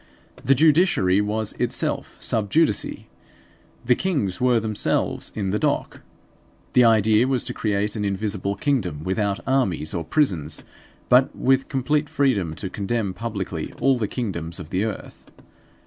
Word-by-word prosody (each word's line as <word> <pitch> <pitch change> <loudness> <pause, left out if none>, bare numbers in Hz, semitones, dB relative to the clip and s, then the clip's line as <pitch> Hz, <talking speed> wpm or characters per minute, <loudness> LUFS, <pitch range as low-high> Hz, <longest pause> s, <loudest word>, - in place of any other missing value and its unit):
The 135 - +4
judiciary 150 - +4
was 105 +1 -2
itself - - -2
sub 105 -3 -1
judice. 155 -8 +2 1.0
The 125 - +5
kings 130 - -1
were 125 -2 +4
themselves 110 -2 -1
in 100 -3 -2
the 105 - 0
dock. - - -1 0.7
The 125 - +6
idea 110 +1 +4
was 130 -3 0
to - - -4
create 105 -1 -1
an 105 - -2
invisible 100 0 -2
kingdom, 95 - -1
without 100 +2 -1
armies 100 - 0
or 85 - -2
prisons, 85 - 0 0.4
but 125 +2 +4
with 135 0 +1
complete 145 +3 0
freedom 100 - +1
to 95 - -5
condemn 100 +1 -2
publicly 95 -6 -5
all 135 -1 +3
the 105 - 0
kingdoms 85 -10 -4
of 75 - -9
the 95 +3 0
earth. 110 - -7
105 Hz, 145 wpm, -23 LUFS, 95-130 Hz, 1.0 s, The